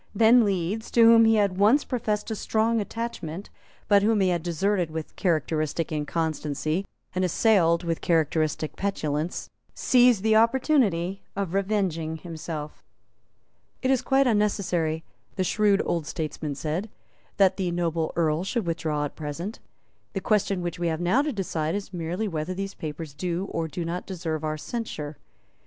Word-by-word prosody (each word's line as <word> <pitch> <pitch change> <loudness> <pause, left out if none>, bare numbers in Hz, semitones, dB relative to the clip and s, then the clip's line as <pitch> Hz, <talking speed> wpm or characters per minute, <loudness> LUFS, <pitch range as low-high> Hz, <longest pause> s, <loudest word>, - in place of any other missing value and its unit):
Then 230 +3 +6
Leeds, 200 +2 -1
to 235 - +6
whom 230 0 +8
he 225 0 +5
had 200 -3 +1
once 225 +9 +5
professed 220 -4 -2
a - - -1
strong 225 +2 +1
attachment, 200 -5 -5 0.4
but 200 -1 +5
whom 215 +1 +3
he 190 -1 +3
had 175 -2 0
deserted 175 +1 0
with 160 0 -6
characteristic 160 -2 0
inconstancy 155 +2 -2 0.3
and 185 - 0
assailed 180 -3 +3
with 165 -1 -2
characteristic 155 -2 0
petulance, 160 -5 -2 0.2
seized 245 -5 +4
the 220 0 +4
opportunity 220 - +2
of 195 -3 -2
revenging 190 -6 0
himself. 155 -2 -7 1.0
"It 260 - +3
is 265 - +3
quite 270 0 +3
unnecessary," 190 -8 +1 0.3
the 190 - 0
shrewd 205 +2 +2
old 165 -3 -1
statesman 155 -2 -4
said, 160 +9 -3 0.5
"that 190 -1 +4
the 185 -2 -1
noble 170 -2 -1
Earl 160 0 +1
should 215 +2 -2
withdraw 160 -3 -1
at 145 - -7
present. 165 +7 -5 0.5
The - - -1
question 200 -3 +1
which 175 -1 -4
we 175 - 0
have 160 -1 -1
now 180 +10 +3
to 300 +1 -1
decide 170 - -2
is 200 -1 -5
merely 175 +5 -2
whether 165 0 -3
these 195 +1 -4
papers 155 -1 -6
do 175 +4 -2
or 165 -1 -2
do 165 +3 -4
not 175 +2 -4
deserve 165 -4 -3
our 155 0 -2
censure. 155 -7 -5
180 Hz, 155 wpm, -26 LUFS, 160-210 Hz, 1.0 s, whom